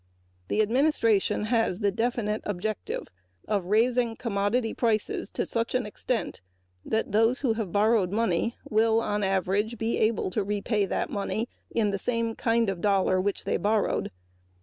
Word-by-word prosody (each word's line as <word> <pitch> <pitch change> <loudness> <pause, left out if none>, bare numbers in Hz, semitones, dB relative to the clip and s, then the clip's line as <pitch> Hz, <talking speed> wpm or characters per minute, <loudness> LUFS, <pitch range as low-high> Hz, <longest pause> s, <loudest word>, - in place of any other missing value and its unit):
The 215 - +2
administration 230 -4 +2
has 225 -4 +1
the 205 -1 +1
definite 225 -1 -1
objective 205 +1 -3 0.4
of 205 -4 0
raising 230 +3 +2
commodity 225 +1 0
prices 220 -3 0
to - - -2
such 230 +1 -1
an 250 - +1
extent 225 +3 -3 0.4
that 220 -1 -1
those 225 +5 +3
who 250 -5 +2
have 220 -5 -4
borrowed 205 -2 +3
money 225 +1 0
will, 220 +1 +3
on 210 -2 -1
the 195 - +1
average, 195 +4 0
be 225 +2 -1
able 215 -3 +1
to 210 - 0
repay 205 +1 0
that - - -2
money 215 +3 -2 0.2
in 215 -3 +1
the 200 - -2
same 230 +1 -1
kind 230 -1 +1
of 190 -3 -2
dollar 195 -2 +2
which 200 +1 -2
they - - 0
borrowed. 210 0 0
215 Hz, 160 wpm, -27 LUFS, 200-230 Hz, 0.4 s, those